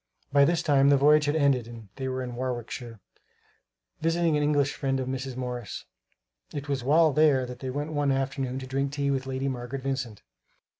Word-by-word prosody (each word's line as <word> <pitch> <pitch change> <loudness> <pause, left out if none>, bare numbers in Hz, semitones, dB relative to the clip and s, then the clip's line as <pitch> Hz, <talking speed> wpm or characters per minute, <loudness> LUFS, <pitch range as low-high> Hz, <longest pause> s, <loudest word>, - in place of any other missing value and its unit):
By 140 -1 +6
this 170 +2 +1
time 140 -1 +4
the 140 - +6
voyage 150 +2 +5
had 145 +1 +1
ended 140 -6 +2
and 115 -3 -11
they 130 - -3
were 130 0 -2
in 125 -1 -6
Warwickshire, 120 -2 -5 1.0
visiting 165 0 +2
an 150 - +1
English 145 -1 +2
friend 135 -1 -1
of 130 - -3
Mrs. 130 0 -4
Morris. 125 -4 -5 0.7
It 145 0 -4
was 140 -3 -2
while 155 +3 +4
there 145 -3 +4
that 125 0 -8
they 130 - -4
went 145 +4 -3
one 145 -2 +1
afternoon 135 -1 -1
to 135 - -5
drink 135 +2 -2
tea 140 -1 0
with 135 -1 -2
Lady 135 +1 -2
Margaret 130 +1 -4
Vincent. 130 -6 -3
135 Hz, 195 wpm, -27 LUFS, 130-145 Hz, 1.0 s, By